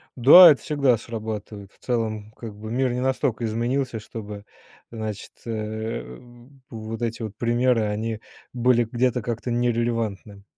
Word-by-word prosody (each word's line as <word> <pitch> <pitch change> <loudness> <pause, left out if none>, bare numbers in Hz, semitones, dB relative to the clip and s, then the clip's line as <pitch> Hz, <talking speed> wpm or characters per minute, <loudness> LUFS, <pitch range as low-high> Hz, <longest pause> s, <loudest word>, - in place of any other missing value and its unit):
Да, 155 +7 +10
это 140 - 0
всегда 140 -5 +2
срабатывает. 105 -3 -7
В - - -29
целом, 110 -3 -2
как 110 -3 -9
бы 110 +2 -8
мир 130 +1 +1
не 125 - -2
настолько 125 -3 -1
изменился, 120 +2 -1
чтобы, 105 -1 -9 0.5
значит, 110 -3 -6
э, 110 - -5 0.5
вот 115 0 -7
эти 115 0 -3
вот 105 -2 -6
примеры, 120 0 +2
они 110 +1 -3 0.3
были 120 0 +3
где-то 125 0 +1
как-то 120 +1 -4
нерелевантны. 115 -4 -2
115 Hz, 135 wpm, -24 LUFS, 110-120 Hz, 0.5 s, Да